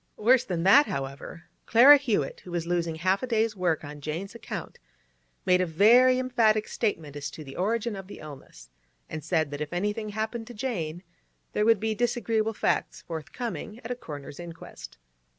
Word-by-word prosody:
Worse 245 +3 +4
than 175 -8 -3
that, 275 +10 +7
however, 140 +4 -6 0.2
Clara 265 +6 +9
Hewett, 220 - -1
who - - -13
was 170 -1 -2
losing 170 -2 -1
half 185 +4 +1
a 255 - -3
day's 225 -2 +1
work 175 -5 0
on 145 0 -9
Jane's 165 +8 -5
account, 230 -2 -7 0.7
made 180 0 +4
a - - +2
very 240 +10 +6
emphatic 230 -4 +2
statement 160 - -2
as 145 0 -4
to 155 - -9
the 135 -2 -10
origin 220 +4 -1
of 195 -1 -8
the - - -10
illness, 135 - -12 0.4
and 155 -1 -5
said 160 -2 0
that 145 +1 -5
if 150 - -4
anything 210 +4 -2
happened 220 +2 -4
to 240 - -10
Jane, 180 -8 -3 0.5
there 210 - +1
would 225 -2 +5
be 220 +1 -1
disagreeable 225 -1 0
facts - - -1
forthcoming 215 - -6
at 230 - -6
a - - -1
coroner's 145 - -9
inquest. 165 - -10
195 Hz, 180 wpm, -27 LUFS, 160-230 Hz, 0.7 s, Clara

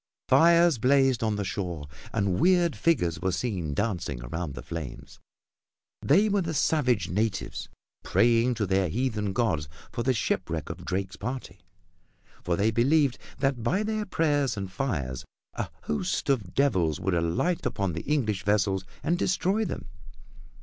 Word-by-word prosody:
Fires 170 -4 +5
blazed 135 -1 +3
on 110 -2 +1
the 105 - -2
shore 90 -6 -4 0.2
and 100 -5 0
weird 175 -2 +4
figures 95 - +1
were 95 +1 +1
seen 90 - -2
dancing 85 - -2
around 75 +3 -4
the - - -7
flames. 80 -4 -7 0.8
They 195 +10 +4
were 205 -1 +2
the 165 -2 -3
savage 125 - +1
natives, 105 0 -2 0.3
praying 120 +1 +3
to 110 -2 0
their 95 -1 +1
heathen 105 -2 -1
gods 85 -10 0 0.2
for - - -3
the 130 +2 +1
shipwreck 80 -7 -2
of - - -9
Drake's 95 +1 -3
party, 120 -4 -5 0.8
for 85 0 +1
they 105 +5 +2
believed 135 +3 +3 0.2
that 135 -3 +1
by 180 - +1
their 215 -1 -2
prayers 145 - +1
and 95 -2 -4
fires 75 - -2 0.3
a - - -3
host 75 - -1
of 105 -10 -2
devils 95 - +2
would 95 0 -1
alight 85 - 0
upon 95 -4 -1
the 85 - -3
English 120 -10 0
vessels 100 -2 +1 0.2
and 170 +5 +1
destroy 195 +4 +1
them. - - -5
110 Hz, 150 wpm, -27 LUFS, 90-140 Hz, 0.8 s, Fires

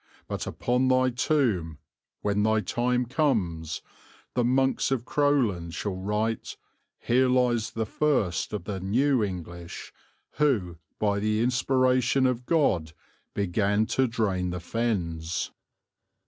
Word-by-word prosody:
But - - -4
upon 125 +11 0
thy 130 0 +3
tomb, 120 - 0 0.4
when 105 0 +1
thy 110 0 +2
time 125 +5 0
comes, 90 - -1 0.5
the 125 - +1
monks 130 +2 +2
of 130 -3 -1
Crowland 120 - +1
shall 100 -3 -3
write, 105 +4 -2 0.4
'Here 130 +2 +2
lies 125 -3 +2
the 110 0 -3
first 110 - 0
of 105 -4 -4
the 95 0 -4
new 125 +7 +2
English; 85 -2 -6 0.4
who, 100 - +1 0.2
by 100 -1 +1
the 110 +1 0
inspiration 130 +1 +2
of 125 -1 -1
God, 95 - +2 0.4
began 100 +2 +1
to 130 -1 +3
drain 95 -6 -1
the 90 0 -3
Fens.'" 85 -6 -2
110 Hz, 120 wpm, -27 LUFS, 90-130 Hz, 0.5 s, thy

